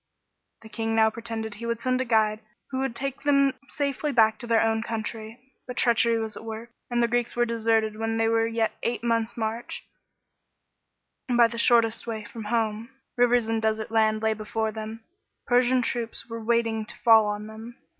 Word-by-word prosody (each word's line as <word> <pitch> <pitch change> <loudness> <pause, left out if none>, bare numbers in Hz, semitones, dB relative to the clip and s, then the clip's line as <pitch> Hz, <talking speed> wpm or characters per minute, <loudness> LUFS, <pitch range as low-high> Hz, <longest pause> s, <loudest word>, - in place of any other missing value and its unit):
The 220 - -12
king 225 0 -2
now 220 0 +4
pretended 225 -1 -5
he 230 +3 -5
would 230 -1 -1
send 255 +1 0
a - - -1
guide 220 -2 +2 0.3
who 260 - -2
would 265 -3 -2
take 275 0 -4
them 275 -2 +3
safely 285 +1 -2
back 220 -3 +4
to 240 - -8
their 230 -1 +4
own 225 0 +1
country; 220 0 -5 0.3
but 250 - -7
treachery 235 -1 +3
was 220 -2 -3
at - - -9
work, 225 +1 -7 0.2
and 240 -1 +1
the - - +3
Greeks 240 0 -1
were 240 0 +2
deserted 225 -2 +1
when 225 0 -1
they 225 0 +2
were 225 0 +2
yet 225 -1 0
eight 235 0 -2
months' 230 -1 0
march, 225 +1 -4 1.5
by 240 -1 +5
the 230 0 -2
shortest 230 -1 +3
way 220 -2 -4
from 225 -1 -8
home. 220 0 -1 0.3
Rivers 245 -1 +3
and 225 0 0
desert 220 0 -1
land 220 -1 +2
lay 220 0 +2
before 220 +1 -3
them; 220 +1 -7 0.4
Persian 250 0 +3
troops 230 -1 -3
were 230 -1 -6
waiting 225 -1 +1
to - - -9
fall 225 -2 +6
on 210 0 -3
them. 220 +2 -10
225 Hz, 190 wpm, -26 LUFS, 220-240 Hz, 1.5 s, fall